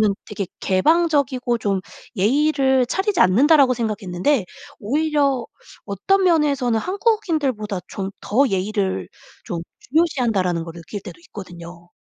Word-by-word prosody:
저는 210 -2 +3
되게 200 -2 -4
'개방적이고 270 - +2
좀 200 -3 -1 0.4
예의를 265 +4 +2
차리지 385 - -1
않는다.'라고 265 - +5
생각했는데 215 +1 -1 0.3
'오히려 280 0 0 0.4
어떤 375 - +1
면에서는 280 -9 +2
한국인들보다 315 - -1
좀 195 -1 -5
더 270 +7 +2
예의를 190 - -1 0.4
좀 170 -1 -4 0.2
중요시한다.'라는 230 - 0
걸 165 0 -9
느낄 170 +5 -8
때도 170 -2 -10
있거든요. 175 -3 -11
235 Hz, 315 characters per minute, -21 LUFS, 190-295 Hz, 0.4 s, 않는다.'라고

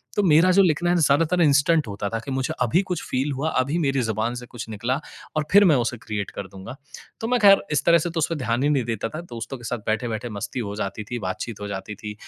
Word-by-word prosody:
तो 205 - +2
मेरा 170 +2 +5
जो 195 +2 +5
लिखना 175 0 +1
है 175 - +3
ना, 170 - +2
ज़्यादातर 160 +5 +3
इंस्टेंट 150 -1 +3
होता 100 0 -4
था 115 - -2
कि 135 +4 -7
मुझे 130 0 -1
अभी 125 - +3
कुछ 180 -3 -4
फ़ील 135 +3 0
हुआ, 140 +4 -1
अभी 140 +5 0
मेरी 135 -4 +1
जुबान 110 +2 -1
से 125 0 -7
कुछ 120 -2 -8
निकला, 120 +6 -2 0.4
और 155 -1 0
फिर 205 +1 +7
मैं 160 - +5
उसे 120 -1 0
क्रिएट 105 -3 -5
कर 100 - -7
दूँगा। 95 +6 -10 0.5
तो 225 - -2
मैं 250 0 +2
ख़ैर 200 -1 +7
इस 150 - +1
तरह 170 0 +6
से 170 +1 -2
तो 165 - -7
उस 155 - +2
पे 165 - -1
ध्यान 120 -3 -1
ही 145 - +3
नहीं 140 -4 +2
देता 115 -1 -3
था। 155 - -6
दोस्तों 125 -4 -7
के 120 - -15
साथ 120 +1 -2
बैठे-बैठे 115 +1 -2
मस्ती 110 +4 -5
हो 100 - -5
जाती 100 0 -4
थी, 120 +3 -5
बातचीत 100 +3 -5
हो 105 - -4
जाती 100 +1 -6
थी, 105 +1 -7
130 Hz, 270 wpm, -23 LUFS, 110-160 Hz, 0.5 s, फिर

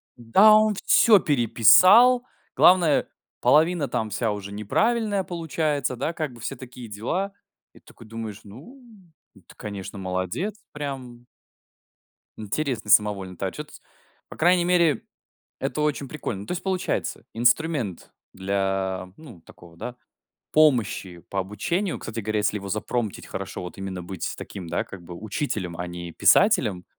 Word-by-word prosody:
Да, 190 - +5
он 215 0 +4
всё 220 -4 +6
переписал, 170 - +6 0.3
главное 175 -5 +5 0.3
половина 160 -1 +3
там 110 -2 -2
вся 115 0 -1
уже 100 -1 -6
неправильная 205 - 0
получается, 155 -6 -2
да, 140 +7 -3
как 155 -5 -4
бы 120 - -14
все 135 +4 -5
такие 125 -1 -10
дела. 170 - -3 0.4
И - - -17
такой 115 - -16
думаешь: 110 -2 -7
ну, 145 - -13 0.5
ну, - - -18
ты, - - -16
конечно, 100 -1 -7
молодец, 95 - -3 0.2
прям 130 -5 -7 1.1
Интересный 120 +4 -3
самовольный 100 -3 +3
та - - -2
отчет. - - -8 0.6
По - - -11
крайней 175 +1 +3
мере, 175 -4 +2 0.6
это - - -3
очень 150 -2 -1
прикольно. 125 -9 -5
Ну, - - -11
то - - -4
есть, 180 0 -4
получается, 190 -1 -2
инструмент 120 - 0 0.2
для, 95 -1 -2
ну, 130 - -13
такого, 85 0 -17
да, 125 +8 -7 0.6
помощи 115 - +2
по 100 - -1
обучению, 165 - -2
кстати 115 +1 -6
говоря, 110 0 -2
если 105 0 0
его 100 0 -8
запромптить 110 +1 -3
хорошо, - - -6
вот, 90 - -8
именно 95 -2 -5
быть 90 0 -5
таким, 90 -4 -8
да, 85 - -1
как 95 -2 -11
бы, 85 +1 -10
учителем, 100 - -4
а 90 - -4
не 85 0 -7
писателем. 110 - +3
120 Hz, 145 wpm, -24 LUFS, 100-160 Hz, 1.1 s, всё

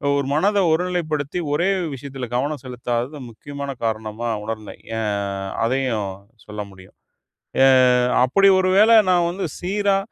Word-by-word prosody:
ஒரு 140 -1 0
மனத 200 +7 +2
ஒருநிலைப்படுத்தி, 160 -2 -1
ஒரே 170 +6 +1 0.2
விஷயத்துல 135 -1 -7
கவனம் 145 +4 -1
செலுத்தாதது, 125 +2 -3
முக்கியமான 140 +4 -7
காரணமா 110 +1 -3 0.2
உணர்ந்தேன். 110 -1 -7 0.2
ஏன் 110 -2 -1 0.5
அதையும் 115 -5 -1 0.4
சொல்ல 105 0 -6
முடியும். 95 -1 -17 0.7
எ - - +7 0.6
அப்டி 195 +10 +4
ஒரு 185 0 +1
வேள 215 +3 +6 0.2
நான் 175 -1 +3
வந்து 190 +3 -3
சீரா, 200 +2 +1
140 Hz, 125 wpm, -21 LUFS, 115-175 Hz, 0.7 s, எ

